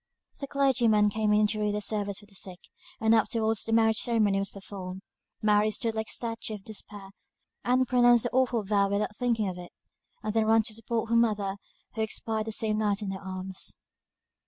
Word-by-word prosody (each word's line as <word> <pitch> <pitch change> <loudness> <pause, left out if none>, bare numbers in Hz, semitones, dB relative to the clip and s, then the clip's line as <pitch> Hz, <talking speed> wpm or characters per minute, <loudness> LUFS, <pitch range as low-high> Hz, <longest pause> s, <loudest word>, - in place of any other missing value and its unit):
The 280 - -4
clergyman 240 -7 +3
came 215 0 0
in 210 0 +4
to 215 +1 -1
read 210 -1 0
the - - 0
service 205 -2 0
for 205 - -10
the 205 - -17
sick, 185 -1 -4 0.4
and 220 0 +3
afterwards 225 0 +2
the 225 - -4
marriage 225 -1 +3
ceremony 215 -4 +2
was 195 - -3
performed. 190 -1 -8 0.4
Mary 210 0 +4
stood 225 +1 -1
like 220 0 -3
a - - -2
statue 225 -2 -2
of 200 - -11
Despair, 205 -2 -7 0.5
and 255 +1 +2
pronounced 245 -1 +5
the 240 - -2
awful 250 -3 +1
vow 200 -1 +2
without 205 +1 -1
thinking 230 -4 0
of 180 -1 -5
it; 175 - -10 0.5
and 215 -1 -2
then 220 -1 +2
ran 225 0 +5
to 215 - -5
support 230 0 -3
her - - +3
mother, 210 -4 +1 0.4
who 220 - -3
expired 220 0 -2
the - - -2
same 215 0 0
night 210 -1 0
in 195 - -3
her 190 - -6
arms. 190 0 -4
215 Hz, 205 wpm, -28 LUFS, 205-225 Hz, 0.5 s, pronounced